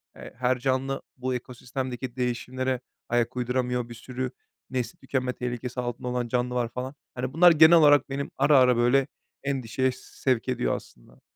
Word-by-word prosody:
Eee, - - -10
her 125 0 +1
canlı 135 +1 0 0.2
bu 130 0 -2
ekosistemdeki 125 0 -5
değişimlere 130 +1 -1 0.3
ayak 120 +1 +1
uyduramıyor. 125 -1 -1
Bir - - -7
sürü 130 +2 -5 0.4
nesli 125 -3 -3
tükenme 130 -1 -2
tehlikesi 125 0 -4
altında 120 0 -4
olan 125 -1 -1
canlı 125 +1 0
var 120 -2 0
falan. 130 +3 -5 0.2
Hani 125 +1 -3
bunlar 175 +3 +7
genel 165 +1 +8
olarak 145 -3 +5
benim 140 +1 -3
ara 140 +1 +5
ara, 125 -1 +5
böyle, 125 +3 +3 0.4
endişeye 130 -2 0
sevk 130 -1 -2
ediyor 125 -1 0
aslında. - - -13
125 Hz, 160 wpm, -26 LUFS, 125-130 Hz, 0.4 s, genel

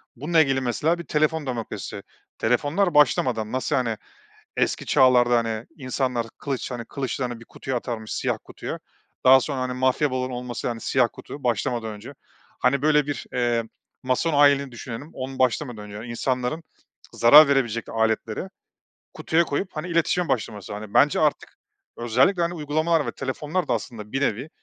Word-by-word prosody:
Bununla 160 +6 +2
ilgili 135 -3 +1
mesela 150 +7 0
bir - - -5
telefon 155 0 0
demokrasisi. 120 -4 -5 0.3
Telefonlar 145 - +1
başlamadan 125 -6 +3
nasıl, 130 0 -1
hani, 120 -4 0 0.6
eski - - 0
çağlarda, 125 -2 +5
hani, 115 -1 -2
insanlar 130 -3 -1
kılıç 135 -2 -4
hani, 120 -2 -5
kılıçlarını 125 -2 -4
bir 120 - -13
kutuya 130 +2 -4
atarmış 115 -3 -5
siyah - - -1
kutuya - - -7 0.5
daha 130 +1 +9
sonra, 135 -2 -3
hani, 130 0 -2
mafya 130 +3 +1
balonu 130 0 -2
olması 125 -1 -4
yani 115 -2 -4
siyah 130 -2 +2
kutu 140 - -10
başlamadan 120 -1 -1
önce, 110 +7 -10 0.5
hani, 130 +2 +2
böyle 150 -1 +3
bir, 145 -3 -4
eee, 120 -2 +1 0.4
mason 130 +5 0
ayini 140 -2 +4
düşünelim. 120 +4 -8
Onu 130 0 -6
başlamadan 125 -3 0
önce 105 +4 -8
insanların 125 +5 -2 0.5
zarar 145 +6 +8
verebilecek 120 -5 0
aletleri 110 - -1 0.7
kutuya 165 +1 +1
koyup, 170 +5 -2
hani, 155 +2 -5
iletişime 170 +1 +1
başlaması, 105 -6 -3
hani, 105 0 -8
bence 145 - +4
artık 150 -2 0 0.4
özellikle, 125 - +2
hani, 170 +1 0
uygulamalar 155 0 0
ve - - -2
telefonlar 150 +6 -3
da - - +1
aslında 105 -1 -5
bir 135 - -1
nevi 135 +2 -1
130 Hz, 155 wpm, -24 LUFS, 120-145 Hz, 0.7 s, daha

